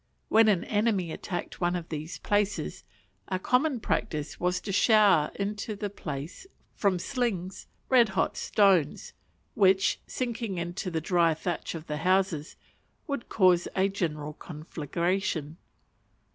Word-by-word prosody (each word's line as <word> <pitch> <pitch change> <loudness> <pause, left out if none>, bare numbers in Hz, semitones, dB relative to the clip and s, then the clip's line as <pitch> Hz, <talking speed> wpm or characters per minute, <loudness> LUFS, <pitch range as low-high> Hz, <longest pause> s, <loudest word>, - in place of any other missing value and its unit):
When 220 0 +6
an 195 -5 +3
enemy 205 -5 0
attacked 175 +1 -5
one 175 0 +1
of 170 -2 -5
these 155 +2 -5
places, 205 0 -1 0.4
a 185 - -1
common 250 +7 +1
practice 155 -7 -2
was 180 0 +1
to 200 - -4
shower 205 -6 +5
into 205 +1 -3
the 205 -1 -4
place, 155 - -7 0.3
from 195 -3 +1
slings, 190 -3 -3 0.2
red 240 -4 +5
hot - - +1
stones, 190 -8 +2 0.4
which, 190 -1 +3
sinking 230 -6 -3
into 175 +3 -3
the 165 -2 -2
dry 170 -1 +3
thatch 170 +1 -4
of 160 -1 -7
the 150 -2 -3
houses, 180 -2 +1 0.5
would 280 -6 -4
cause 185 -4 +4
a 195 +1 +3
general 155 -6 -3
conflagration. 160 +1 -3
185 Hz, 130 wpm, -28 LUFS, 165-205 Hz, 0.5 s, When